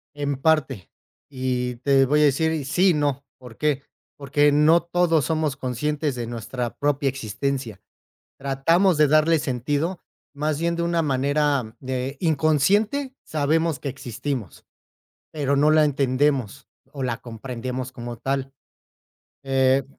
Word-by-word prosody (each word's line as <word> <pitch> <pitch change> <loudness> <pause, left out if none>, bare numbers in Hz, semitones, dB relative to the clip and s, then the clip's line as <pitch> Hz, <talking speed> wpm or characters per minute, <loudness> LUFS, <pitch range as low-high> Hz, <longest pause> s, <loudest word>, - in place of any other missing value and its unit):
En 145 -1 -2
parte, 135 - 0 0.4
y 125 -2 -2
te 135 +1 +3
voy 150 +3 +2
a - - +6
decir 155 +1 +1
sí 180 +6 +3
y - - +4
no, 145 -2 -1
¿por 125 -3 -13
qué?, 145 -2 0 0.3
porque 145 +1 +2
no 155 +3 +4
todos 170 -4 +2
somos 155 -2 0
conscientes 145 +3 -2
de 120 -2 -5
nuestra 120 +1 -5
propia 145 -1 +1
existencia. 130 -2 -4 0.6
Tratamos 155 +6 +2
de 150 -2 +5
darle 155 +2 +4
sentido 145 +7 -2 0.3
más 150 +1 -1
bien 170 0 0
de 170 - -1
una 170 0 +1
manera, 140 -4 0
eh, 130 +1 -3
inconsciente. 190 - +1
Sabemos 155 +1 0
que 140 - -5
existimos, 130 - -5 0.6
pero 140 -2 -1
no 150 +2 +4
la 155 0 +5
entendemos 140 -2 0 0.3
o 140 -2 -5
la 125 -1 -2
comprendemos 125 +2 -6
como 120 -1 -7
tal, 135 +2 -3 0.9
eh, 135 0 +2
140 Hz, 135 wpm, -23 LUFS, 130-155 Hz, 0.9 s, a